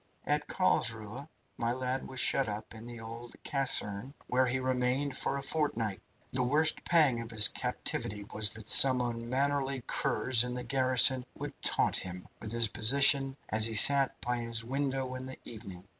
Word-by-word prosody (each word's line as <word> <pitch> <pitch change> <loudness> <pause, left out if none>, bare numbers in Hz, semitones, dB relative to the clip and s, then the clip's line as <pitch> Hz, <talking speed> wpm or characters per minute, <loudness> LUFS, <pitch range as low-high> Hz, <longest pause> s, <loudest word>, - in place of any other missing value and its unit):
At 150 0 -2
Carlsruhe, 115 - -1 0.3
my 115 0 -2
lad 130 +1 -5
was 130 - -8
shut 135 -3 +1
up 105 +2 -8
in 110 +1 -12
the 120 -1 -10
old 115 +1 -11
caserne, 130 -2 -1
where 130 +1 0
he 125 +2 -2
remained 130 +2 -2
for 140 - -3
a 140 - -7
fortnight. 120 -10 -3 0.3
The 130 - -1
worst 150 +5 0
pang 150 -9 +1
of 115 - -10
his 110 -2 +4
captivity 105 0 -5
was 105 -1 +4
that 110 -1 -9
some 130 0 +7
unmannerly 130 +3 -3
curs 125 -2 0
in 125 0 -6
the 125 - -6
garrison 130 0 +3
would - - -8
taunt - - +1
him 90 0 -7
with 110 - -7
his 115 -1 +1
position 135 +4 +4
as 110 0 +2
he 115 -1 -3
sat 135 +4 +7
by 120 0 -3
his 115 -1 -3
window 135 0 -4
in 130 0 -8
the 130 - -10
evening. 95 -4 -10
125 Hz, 175 wpm, -29 LUFS, 115-135 Hz, 0.3 s, some